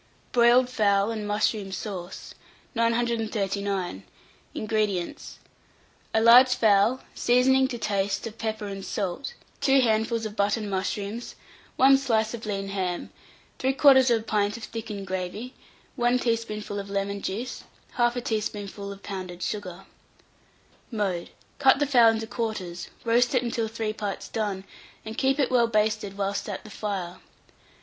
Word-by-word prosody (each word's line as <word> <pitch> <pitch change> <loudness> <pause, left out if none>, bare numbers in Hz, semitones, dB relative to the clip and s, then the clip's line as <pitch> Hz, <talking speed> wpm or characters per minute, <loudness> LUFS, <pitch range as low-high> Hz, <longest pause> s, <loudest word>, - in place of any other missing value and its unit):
BROILED 240 +1 +5
FOWL 205 -3 +2
AND 215 -2 -4
MUSHROOM 205 -1 0
SAUCE. 185 -2 -6 0.4
939. 215 - -1 0.5
INGREDIENTS. 215 +1 -2 0.8
A - - +5
large 250 +2 +8
fowl, 225 +2 +3
seasoning, 260 +2 +3
to 245 - -5
taste, 200 -2 -1
of 225 -1 -8
pepper 220 -1 -3
and 195 -1 -6
salt, 200 - -3 0.2
2 270 -1 +4
handfuls 225 -1 +1
of 210 -1 -5
button 205 +1 0
mushrooms, 200 +4 -3 0.4
1 270 +1 +6
slice 225 -4 +1
of 225 -2 -6
lean 195 -1 -3
ham, 185 -3 -3 0.5
3/4 265 -3 +5
pint 210 0 0
of 230 - -11
thickened 215 -4 -6
gravy, 190 +7 -4 0.4
1 240 0 +3
teaspoonful 225 -4 -2
of 200 0 -7
lemon 200 0 -2
juice, 230 +7 -4 0.3
1/2 240 0 +2
teaspoonful 205 -2 -3
of 200 0 -11
pounded 185 -2 -6
sugar. 185 -4 -5 1.0
Mode. 195 -7 -2 0.3
Cut 270 -2 +6
the 290 - +1
fowl 245 -5 +6
into 225 0 -1
quarters, 220 -7 -4 0.2
roast 240 +2 +3
it 250 - +3
until 230 -1 -1
three 220 -1 -3
parts 205 -2 -4
done, 205 -4 -2 0.4
and 220 0 -6
keep 265 +2 +2
it 275 -4 +1
well 240 -2 +4
basted 215 -2 0
whilst 200 +1 -2
at 200 - -5
the 215 - -12
fire. 195 -4 -4
215 Hz, 135 wpm, -26 LUFS, 200-240 Hz, 1.0 s, large